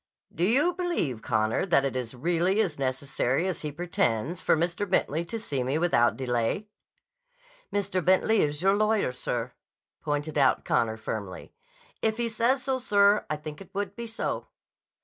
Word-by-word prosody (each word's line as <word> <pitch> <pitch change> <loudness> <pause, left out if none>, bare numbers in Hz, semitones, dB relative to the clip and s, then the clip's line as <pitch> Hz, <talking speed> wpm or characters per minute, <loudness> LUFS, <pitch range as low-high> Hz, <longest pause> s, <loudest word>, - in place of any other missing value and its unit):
"Do 170 - -2
you 275 - +3
believe, 340 - -1
Connor, 110 0 +1
that 140 -6 +3
it 135 - -2
is 125 -1 -4
really 175 - +1
as 175 -10 0
necessary 135 +2 0
as 185 - -3
he 150 - -3
pretends 160 -2 -1
for - - +3
Mr. 170 +4 -1
Bentley 165 -3 +1
to 225 - -5
see 145 - -3
me 130 +4 0
without 160 -8 +3
delay?" 125 - -1 1.0
"Mr. 195 -3 -1
Bentley 190 +4 +4
is 150 +2 -1
your 195 +1 +5
lawyer, 215 -6 +2
sir," 125 -1 -3 0.5
pointed 145 +1 -2
out 135 -2 +3
Connor 110 -1 +1
firmly. 105 -4 -6 0.5
"If 220 0 +1
he 235 -1 0
says 240 +4 +1
so, 265 -1 0
sir, 205 -3 +3
I 155 - 0
think 150 +1 -8
it 195 - -11
would 200 0 -3
be 235 +1 -6
so." 225 - -3
170 Hz, 170 wpm, -27 LUFS, 130-205 Hz, 1.0 s, your